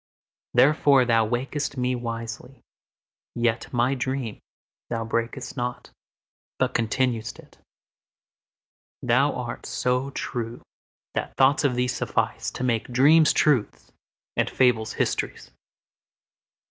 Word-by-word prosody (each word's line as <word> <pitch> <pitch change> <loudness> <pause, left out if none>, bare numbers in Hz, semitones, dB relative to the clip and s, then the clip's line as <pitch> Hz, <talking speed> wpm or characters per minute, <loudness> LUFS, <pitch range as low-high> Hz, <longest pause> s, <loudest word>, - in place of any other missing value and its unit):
Therefore 135 0 +5
thou 115 -2 +3
waked'st 135 +4 -2
me 125 0 0
wisely; 115 +1 -6 0.8
yetMy 120 +2 +1
dream 130 -4 -3 0.5
thou 115 -1 -2
brak'st 115 +3 -3
not, 125 -1 -4 0.7
but - - 0
continued'st 115 0 -1
it:Thou - - -5
art - - -5
so 125 +2 0
true 120 -3 -5 0.5
that - - -4
thoughts 135 +3 +4
of 135 -4 +2
thee 125 +1 +1
sufficeTo 125 0 -2
make 115 -3 0
dreams 145 +5 +5
truths 135 -8 +1 0.4
and - - +1
fables 120 -4 +2
histories. - - -2
125 Hz, 95 wpm, -25 LUFS, 115-135 Hz, 0.8 s, Therefore